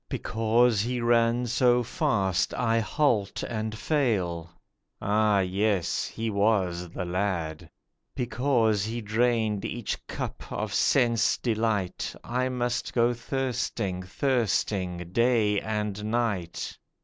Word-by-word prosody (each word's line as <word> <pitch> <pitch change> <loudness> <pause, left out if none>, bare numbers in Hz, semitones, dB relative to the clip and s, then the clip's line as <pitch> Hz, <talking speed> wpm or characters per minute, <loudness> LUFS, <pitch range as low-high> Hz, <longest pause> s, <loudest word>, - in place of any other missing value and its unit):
Because 115 0 +2
he 125 +3 -1
ran 120 +1 +3
so 125 0 +3
fast, 115 - 0
I 115 -2 +2
halt 110 -3 0
and 110 -1 -3
fail 100 - 0 0.5
(Ah, 105 -1 +2
yes, 95 0 0
he 115 0 -4
was 95 -4 +1
the 90 +2 -5
lad), 85 -3 -2 0.5
Because 120 -4 +1
he 115 +3 -3
drained 110 -1 +1
each 120 -3 -4
cup - - -6
of - - -3
sense 120 -4 +3
delight 110 -5 -1
I 125 +2 -1
must 120 -1 -2
go 120 0 +3
thirsting, 120 -7 -2
thirsting, 95 -5 -1
day 115 -3 +3
and 105 -1 -3
night. 110 -7 -2
110 Hz, 110 wpm, -27 LUFS, 100-120 Hz, 0.5 s, ran